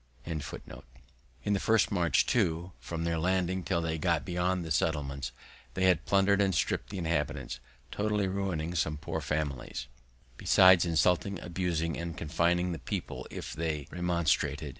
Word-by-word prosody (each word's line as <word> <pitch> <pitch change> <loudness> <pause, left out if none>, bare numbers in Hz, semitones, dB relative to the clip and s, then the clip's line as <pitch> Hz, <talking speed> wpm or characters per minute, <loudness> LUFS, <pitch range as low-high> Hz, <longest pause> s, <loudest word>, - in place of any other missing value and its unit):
In 80 -2 -3 1.0
their 100 -1 +1
first 110 +2 +3
march, 85 -7 +3
too, 90 -5 +1
from 85 -1 -4
their 85 -1 0
landing 95 +1 +1
till 85 -2 -1
they 80 -1 -2
got 85 -2 +1
beyond 90 0 0
the 80 - -6
settlements, 70 -4 -1 0.4
they 95 - 0
had 90 -3 +3
plundered 100 +1 +4
and 95 -3 +2
stripped - - 0
the 100 - -5
inhabitants, 80 -7 -2 0.3
totally 105 -1 0
ruining 95 -4 -2
some 80 -2 0
poor - - -4
families, 70 -5 -3 0.5
besides 95 -1 +6
insulting, 90 +3 +2
abusing, 85 -2 -2
and 85 0 -5
confining 85 +3 +1
the 85 - -4
people 65 - -5
if - - -6
they 75 -3 -2
remonstrated. 85 -3 0
85 Hz, 145 wpm, -30 LUFS, 80-95 Hz, 1.0 s, besides